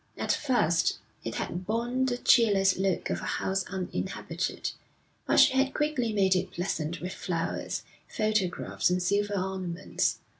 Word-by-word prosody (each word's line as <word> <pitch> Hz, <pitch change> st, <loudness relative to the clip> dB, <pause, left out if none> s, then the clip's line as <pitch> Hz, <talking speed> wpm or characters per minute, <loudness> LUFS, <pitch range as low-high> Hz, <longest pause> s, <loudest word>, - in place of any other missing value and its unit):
At -, -, 0 dB
first 175 Hz, -, +2 dB, 0.3 s
it 115 Hz, -, -4 dB
had 180 Hz, +1 st, -4 dB
borne 240 Hz, +4 st, 0 dB
the 245 Hz, -1 st, 0 dB
cheerless 200 Hz, -6 st, +4 dB
look 190 Hz, -2 st, 0 dB
of -, -, -2 dB
a -, -, -2 dB
house 190 Hz, 0 st, 0 dB
uninhabited, 185 Hz, -2 st, -3 dB, 0.6 s
but -, -, +4 dB
she -, -, +7 dB
had 270 Hz, +1 st, +2 dB
quickly 295 Hz, -7 st, 0 dB
made 195 Hz, -3 st, +3 dB
it 185 Hz, -, 0 dB
pleasant 170 Hz, -2 st, -3 dB
with 180 Hz, +2 st, -4 dB
flowers, 170 Hz, -4 st, -3 dB, 0.2 s
photographs, 215 Hz, -6 st, 0 dB
and 180 Hz, 0 st, +1 dB
silver 205 Hz, +3 st, +1 dB
ornaments. 185 Hz, -2 st, -1 dB
195 Hz, 145 wpm, -28 LUFS, 180-230 Hz, 0.6 s, she